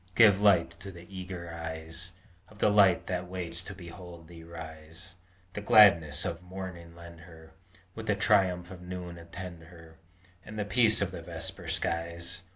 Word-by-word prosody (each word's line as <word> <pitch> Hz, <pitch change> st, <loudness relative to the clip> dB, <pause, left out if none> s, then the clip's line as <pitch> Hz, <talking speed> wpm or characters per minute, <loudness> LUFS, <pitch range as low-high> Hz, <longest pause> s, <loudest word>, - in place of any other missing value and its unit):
Give 105 Hz, -4 st, +7 dB
light 90 Hz, -5 st, +5 dB
to 100 Hz, -, -8 dB
the 85 Hz, -1 st, -12 dB
eager 90 Hz, -2 st, -6 dB
eyes 80 Hz, +2 st, -6 dB, 0.4 s
Of 110 Hz, -, -17 dB
the 105 Hz, -, +3 dB
Land 100 Hz, -4 st, +6 dB
that 90 Hz, -1 st, -3 dB
waits 85 Hz, -2 st, -2 dB
to 95 Hz, +2 st, -8 dB
behold 85 Hz, -2 st, -11 dB
thee 85 Hz, -1 st, -12 dB
rise; 80 Hz, +2 st, -10 dB, 0.4 s
The 105 Hz, -, -4 dB
gladness 85 Hz, -8 st, +6 dB
of 85 Hz, -1 st, -3 dB
morning 90 Hz, -2 st, -8 dB
lend 85 Hz, -1 st, -12 dB
her, 80 Hz, -2 st, -14 dB, 0.4 s
With -, -, -8 dB
the -, -, +3 dB
triumph 90 Hz, -2 st, +2 dB
of 90 Hz, -1 st, -9 dB
noon 90 Hz, -1 st, -7 dB
attend 85 Hz, 0 st, -9 dB
her, 80 Hz, -1 st, -15 dB, 0.5 s
And 110 Hz, +2 st, -9 dB
the 105 Hz, -, -1 dB
peace 110 Hz, 0 st, +4 dB
of -, -, -3 dB
the -, -, -7 dB
vesper -, -, -7 dB
skies! 85 Hz, +2 st, -2 dB
85 Hz, 165 wpm, -30 LUFS, 85-95 Hz, 0.5 s, Give